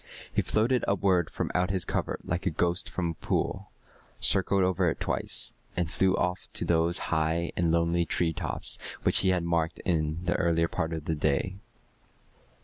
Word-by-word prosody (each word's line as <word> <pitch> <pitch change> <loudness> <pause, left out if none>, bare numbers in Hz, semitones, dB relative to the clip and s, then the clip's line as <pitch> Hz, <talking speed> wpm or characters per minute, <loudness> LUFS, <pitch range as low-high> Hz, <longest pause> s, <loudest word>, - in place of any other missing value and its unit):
He - - +3
floated 120 +4 +1
upward 95 -4 +2
from - - -3
out 90 0 +1
his 95 -3 0
covert - - -2
like 90 +2 -2
a - - +4
ghost 85 +2 0
from 85 -2 -2
a 80 - -13
pool, - - -1 0.5
circled 95 0 +3
over 90 -1 +2
it - - -4
twice, - - -1 0.2
and 85 -2 -1
flew 95 0 +2
off 90 0 -2
to - - +2
those 85 +1 +2 0.2
high 80 +2 0
and 85 -2 +1
lonely 85 +1 +2
treetops 80 -1 0 0.2
which - - +3
he 95 - +3
had 90 -2 +1
marked 85 0 0
in 80 -2 0
the 90 - +2
earlier 85 -1 +2
part 80 -1 -2
of 80 -2 -5
the 80 - 0
day. 75 +5 0
85 Hz, 175 wpm, -28 LUFS, 80-90 Hz, 0.5 s, a